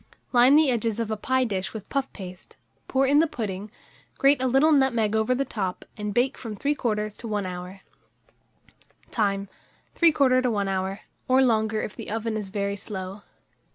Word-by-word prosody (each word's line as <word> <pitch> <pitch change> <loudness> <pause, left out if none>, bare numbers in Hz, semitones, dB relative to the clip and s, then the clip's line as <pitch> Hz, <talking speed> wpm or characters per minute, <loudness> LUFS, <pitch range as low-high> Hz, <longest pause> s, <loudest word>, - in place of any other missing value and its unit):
Line 250 +3 +6
the 305 -3 +5
edges 230 -2 -1
of 225 -1 -2
a - - 0
pie 260 +5 +1
dish 195 -4 -3
with 215 - -7
puff 275 -1 -2
paste, 185 -3 -11 0.3
pour 270 +1 +2
in 285 +2 +4
the 325 - +4
pudding, 210 -6 -5 0.5
grate 275 -1 +4
a 260 - +2
little 270 +5 +4
nutmeg 240 -7 +3
over 220 +3 +2
the 275 +2 0
top, 195 -7 -4
and 210 -1 -4
bake 250 +5 +1
from 225 -4 -6
3/4 215 -6 -1
to 235 - -7
1 210 -2 -1
hour. 180 +1 -7 1.3
Time. 200 -3 0 0.5
3/4 275 -6 +4
to 255 - +1
1 205 -3 0
hour, 190 +1 -2 0.3
or 260 +1 +5
longer 220 -3 +1
if 210 - -5
the - - -7
oven 225 0 -2
is 210 -3 -4
very 200 0 -2
slow. 195 -1 -7
220 Hz, 180 wpm, -25 LUFS, 200-260 Hz, 1.3 s, Line